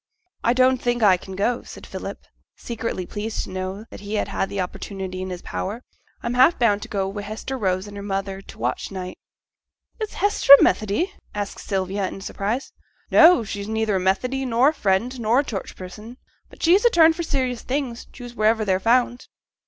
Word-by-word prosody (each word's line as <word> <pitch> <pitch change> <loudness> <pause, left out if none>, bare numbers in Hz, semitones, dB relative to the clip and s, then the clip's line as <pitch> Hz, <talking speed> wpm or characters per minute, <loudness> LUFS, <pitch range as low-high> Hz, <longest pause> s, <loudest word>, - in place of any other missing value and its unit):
'I 235 - +3
don't 255 0 +3
think 240 -1 0
as 205 - +7
I 185 - +5
can 190 +1 -9
go,' 235 +5 0
said - - -11
Philip, - - -6 0.4
secretly 230 -5 -4
pleased 215 +4 -4
to - - -9
know 185 +3 -5
that - - -9
he 205 +1 -5
had 195 - -1
the 200 - -4
opportunity 185 0 -5
in 185 - -4
his 180 -1 -6
power; 215 +6 -4 0.4
'I'm 235 - -1
half 260 +7 +5
bound 210 -4 +2
to - - -7
go 195 -2 -1
Wi' 200 +1 -5
Hester 215 +6 -5
Rose 190 -5 -1
and 205 -1 -10
her 200 - -6
mother 195 -1 -3
to - - -25
t' - - -19
watch 120 +2 -2
night.' 185 -2 -7 0.8
'Is 435 -1 -4
Hester 410 -8 +6
a - - +5
Methodee?' 215 - +1 0.2
asked 205 -1 -4
Sylvia 195 0 -2
in 195 - -7
surprise. 205 +6 -3 0.4
'No! 335 -6 +7
she's 200 -1 -5
neither 220 -2 0
a - - 0
Methodee, 250 +9 0
nor 250 +2 +3
a - - -3
Friend, 235 +1 0
nor 235 +4 +3
a - - -10
Church 200 -7 -5
person; 210 +6 -10 0.3
but - - -13
she's 360 +5 +5
a 475 - +6
turn 325 -6 +6
for 335 - -4
serious 260 -6 -1
things, 255 -3 -3
choose 245 -2 -10
wherever 220 -1 +2
they're 190 -2 +2
found.' 245 +3 +1
215 Hz, 205 wpm, -23 LUFS, 195-250 Hz, 0.8 s, as